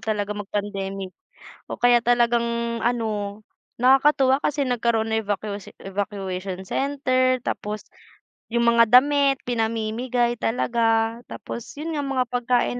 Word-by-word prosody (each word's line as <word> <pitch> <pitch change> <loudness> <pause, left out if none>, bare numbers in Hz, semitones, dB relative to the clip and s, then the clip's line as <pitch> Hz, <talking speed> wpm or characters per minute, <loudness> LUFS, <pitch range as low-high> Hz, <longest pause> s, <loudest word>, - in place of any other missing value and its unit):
talaga 210 -1 -2
mag-pandemic. 195 -2 -4 0.6
Oh, - - -5
kaya 240 -1 +4
talagang 235 -1 +1
ano, 215 -3 -2 0.4
nakakatuwa 270 +2 +4
kasi 285 -2 0
nagkaroon 225 -2 0
ng 220 - +1
evacuatio 205 0 -4 0.2
evacuation 190 -1 -4
center, 255 0 +1
tapos 210 0 -4 0.6
yung 235 0 +1
mga 235 0 +6
damit 280 -1 +1
pinamimigay 235 +1 -1
talaga, 225 -1 +1
tapos 235 - -8
yun 320 +2 -4
nga 290 - -1
mga 260 -2 0
pagkain 245 0 0
235 Hz, 115 wpm, -23 LUFS, 210-250 Hz, 0.6 s, mga